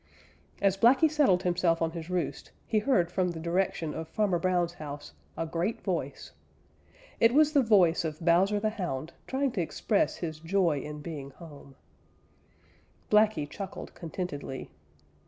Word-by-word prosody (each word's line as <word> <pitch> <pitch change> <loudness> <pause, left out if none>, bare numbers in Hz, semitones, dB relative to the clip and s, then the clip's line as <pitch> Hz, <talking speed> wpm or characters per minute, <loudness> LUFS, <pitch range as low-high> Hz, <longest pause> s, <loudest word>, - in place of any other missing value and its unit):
As 195 -1 +3
Blacky 265 +9 +5
settled 270 -13 +3
himself 175 -2 +2
on 165 -1 0
his 165 0 -7
roost 180 -2 -3 0.2
he 215 - +1
heard 210 -7 +2
from 180 0 +1
the 170 -2 -5
direction 170 -2 -1
of 160 0 -5
Farmer 195 -2 0
Brown's 175 -1 +1
house 145 -3 -8 0.2
a 165 - -1
great 170 +7 -2
voice. - - -3 0.9
It 230 +2 +4
was 305 0 +5
the 285 - +5
voice 185 -8 +4
of 155 -2 -4
Bowser 180 +5 +3
the 215 +1 0
Hound 170 -8 -4
trying 270 0 0
to 195 - -1
express 200 +5 0
his 160 -3 -5
joy 165 -2 +1
in 150 +1 -7
being 145 -5 -6
home. 140 -2 -13 1.4
Blacky 210 -8 +4
chuckled 195 +6 -7
contentedly. 160 - -6
175 Hz, 150 wpm, -29 LUFS, 160-205 Hz, 1.4 s, Blacky